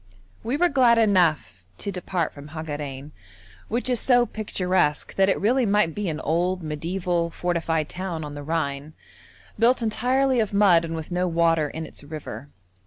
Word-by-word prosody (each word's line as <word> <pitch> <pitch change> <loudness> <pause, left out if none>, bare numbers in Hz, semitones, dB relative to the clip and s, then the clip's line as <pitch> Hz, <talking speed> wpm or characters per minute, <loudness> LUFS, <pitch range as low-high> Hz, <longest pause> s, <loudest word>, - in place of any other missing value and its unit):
We 240 +5 -2
were 355 - +4
glad 255 -6 +4
enough 160 - +2
to 200 - -4
depart 180 -2 -2
from 145 0 -11
Hagarein, 145 -3 -6 0.6
which 235 +4 -1
is 250 -2 +1
so 245 -2 +4
picturesque 185 -8 -1
that 195 0 +3
it - - +1
really 250 +6 +2
might 205 -6 +2
be 205 -1 -2
an 155 - -3
old, 175 +3 0
mediæval, 170 +2 -2
fortified 165 -3 -1
town 175 -3 -5
on 150 -1 -7
the 145 - -7
Rhine, 145 -1 -3 0.7
built 240 +1 +3
entirely 255 +4 +1
of 215 -2 0
mud 190 -5 +5
and 165 0 -4
with 160 +2 -7
no 180 +1 0
water 165 -3 +2
in 160 +2 -6
its 145 - -12
river. 145 -4 -8
175 Hz, 170 wpm, -24 LUFS, 155-210 Hz, 0.7 s, mud